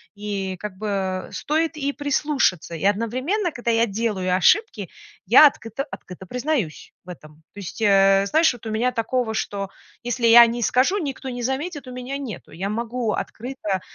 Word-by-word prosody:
и 200 -2 -4
как 210 -3 -7
бы 190 -3 -2
стоит 320 +2 -1
и 285 -2 -2
прислушаться. 285 - 0
И 165 - -4
одновременно, 255 - 0
когда 240 -4 -2
я 230 0 +3
делаю 200 -4 -1
ошибки, 245 - +2 0.4
я 250 +10 +8
открыто 230 -1 -4
открыто 185 +1 -10
признаюсь 250 - -3
в 180 - -15
этом. 155 -3 -12
То 205 - -10
есть, 200 +3 -8
э, 195 -1 +4
знаешь, 320 +6 +3
вот 240 -2 -13
у - - -3
меня 240 +4 +1
такого, 230 0 -1
что 200 -2 -3 0.3
если 240 0 0
я 235 +1 +9
не 235 +1 -3
скажу, 255 - +2
никто 275 -4 -5
не 245 -1 -5
заметит, 275 +3 -3
у - - -7
меня 250 +2 -5
нету. 250 -9 -8
Я 185 +5 -4
могу 230 +1 -2
открыто, 215 -6 -4
230 Hz, 170 wpm, -23 LUFS, 195-265 Hz, 0.4 s, я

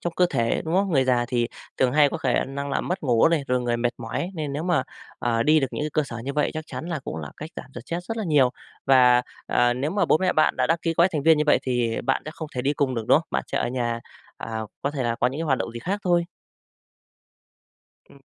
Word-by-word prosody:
trong 175 - -3
cơ 180 - +4
thể, 115 0 0
đúng 160 +2 -2
không? 195 0 +2
Người 135 -3 +4
già 125 -2 +2
thì 120 -2 0 0.3
thường 130 -1 +2
hay 145 -1 +5
có - - -4
khả 130 -6 +1
năng 140 +1 -5
là - - 0
mất 180 - -3
ngủ 120 -1 +4
này, 165 -4 +1
rồi 125 0 +2
người 120 -1 0
mệt 120 0 +1
mỏi 120 +10 -4
nên 150 -4 -3
nếu 150 +3 -3
mà, 175 -6 +1 0.4
ờ, 115 -1 +1
đi 155 +2 +4
được 135 - +1
những - - -4
cái 155 - -2
cơ 155 - +2
sở 120 -4 -7
như 140 - -3
vậy 150 +1 +1
chắc 155 0 -4
chắn 160 - -6
là 170 -3 -2
cũng - - -5
là 75 -3 -6
cách 155 +1 -8
giảm - - -7
stress 170 +1 -5
rất 225 +4 -4
là 220 - -2
nhiều. 145 -6 +4 0.4
Và, 125 -2 +6 0.2
ờ, 120 0 +2
nếu 140 +4 -2
mà 200 +3 +1
bố - - +3
mẹ 185 +1 +1
bạn 155 - +2
đã - - +2
đăng 165 +1 +2
ký 165 -1 0
gói 170 +2 +5
thành 150 -3 -1
viên 160 0 +5
như 150 - +2
vậy 150 - +5
thì 120 -3 0
bạn 135 - +1
sẽ 155 - -5
không 160 - -6
thể 125 - -2
đi 140 +2 +1
cùng 140 -3 0
được, 115 -2 -3
đúng - - +7
không? 165 - -9
Bạn - - -1
sẽ - - -2
ở - - 0
nhà, 120 -2 -2 0.4
à, 110 -1 -5 0.2
có 140 - 0
thể 140 -3 -3
là 115 -1 0
có - - +4
những 135 +4 -3
cái - - -1
hoạt 135 -5 +1
động - - -3
gì 120 - -6
khác 195 +9 -2
thôi. 175 -2 +3 1.8
Ừm. 140 - -18
140 Hz, 280 wpm, -24 LUFS, 125-160 Hz, 1.8 s, đúng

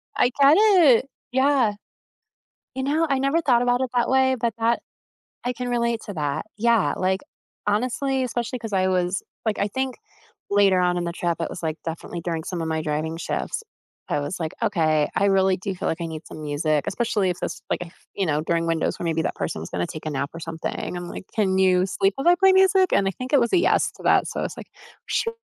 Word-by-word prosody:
I 245 - +3
get 280 +3 +7
it. 350 - +6 0.3
Yeah. 260 -4 +3 1.0
You 265 - -2
know, 310 +4 +1
I 275 -1 +2
never 275 +5 +2
thought 250 -6 +3
about 245 +1 +2
it 260 - -1
that 240 - +2
way, 260 0 +3
but 230 -2 0
that 230 +1 +2 0.6
I 250 0 -1
can 250 +1 -5
relate 235 -1 0
to 205 - -6
that. 145 -3 -2
Yeah, 230 -1 +3
like, 190 +1 0 0.5
honestly 255 +5 0
especially 240 0 -3
'cause 220 -3 -6
I 185 0 +2
was 180 0 0 0.2
like, 220 -2 0
I 200 - +1
think 260 +4 -3 0.5
later 200 -2 +4
on 180 0 +2
in 175 - -1
the 170 - -2
trip, 170 -1 -2
it - - -2
was, - - -7
like, 160 0 -2
definitely 165 +1 -5
during 165 -1 -3
some 175 -2 -4
of 160 - -2
my 160 0 -1
driving 155 +1 -2
shifts, 315 - -3 0.5
I - - +1
was 145 +6 -4
like, 160 -1 -3
"Okay, 155 -5 +2
I 200 - +2
really 190 -1 +3
do 190 +1 -4
feel - - -3
like 165 - -2
I - - -2
need 160 0 -7
some - - -9
music," 150 0 0
especially 205 -2 0
if 175 - -7
this, - - -4
like, - - 0
if 170 0 -11
you 195 - 0
know, 150 0 +1
during 165 +1 0
windows 165 -1 -1
where - - -4
maybe 165 -1 0
that - - -1
person - - -3
was 80 - -7
gonna 90 -1 -2
take 155 - -8
a 155 - -2
nap 140 0 -2
or 165 - -7
something, 165 +2 -5
I'm 175 0 -6
like, - - -8
"Can 190 -3 +2
you 185 -1 +4
sleep 195 +1 +1
while 270 +5 -2
I 350 - +6
play 385 +1 +5
music?" 380 -1 +4
And 195 - +3
I - - +1
think 255 +7 -7
it 285 - +7
was 235 -1 +1
a - - +6
"yes" 350 - +2
to - - -15
that, - - +4
so, - - -4
I - - -1
was - - -3
like, - - -9 0.4
"Shew!" 460 -1 0
195 Hz, 240 wpm, -24 LUFS, 165-255 Hz, 1.0 s, get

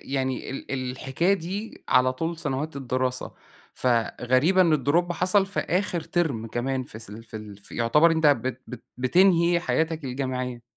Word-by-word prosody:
يعني 130 -1 -2
ال 130 -1 -4
الحكاية 135 +9 0
دي 195 +4 -6
على 130 0 +4
طول 165 +6 -3
سنوات 150 0 -3
الدراسة، 130 -1 -2 0.4
فغريبة 130 +8 +2
إن 155 -7 +3
الdrop 175 +5 +2
حصَل 185 +3 +2
في 195 - -2
آخر 180 -1 -1
تِرم 150 -10 -1
كمان، 130 +3 -2
في 110 - -10
س 110 -2 -9
ال 115 +2 -10
في 110 - -9
ال 105 -2 -9
ف 100 - -16
يعتبر 150 +8 +4
أنت 160 -1 +2
بت 130 -3 +1
بت 125 - -9
بتنهي 170 +5 +4
حياتك 160 -2 -1
الجامعية. 125 -2 -3
135 Hz, 160 wpm, -25 LUFS, 125-170 Hz, 0.4 s, على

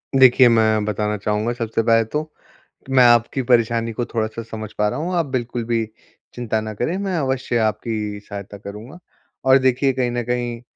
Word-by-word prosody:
देखिए, 130 -1 +7
मैं 110 -2 +3
बताना 105 0 -1
चाहूँगा 105 +3 -1
सबसे 115 -1 -2
पहले 115 0 +4
तो, 150 +7 -2 0.6
कि 135 - -10
मैं 130 -1 +6
आपकी 120 +3 +3
परेशानी 115 -1 +2
को 120 +2 -2
थोड़ा-सा 110 0 -3
समझ 110 -1 -7
पा 105 0 +2
रहा 125 - -4
हूँ, 180 +3 -3
आप 170 - +1
बिल्कुल 120 -3 -3
भी 115 -1 0 0.5
चिंता 115 -3 -2
ना 110 0 -5
करें, 140 - -2
मैं 195 -2 -2
अवश्य 130 -4 -1
आपकी 105 -1 -2
सहायता 100 0 -8
करूँगा। 105 - -10 0.5
और 130 0 +7
देखिए 130 +1 +2
कहीं 125 -2 -1
न 120 0 -2
कहीं 120 -1 -3
115 Hz, 185 wpm, -21 LUFS, 110-130 Hz, 0.6 s, देखिए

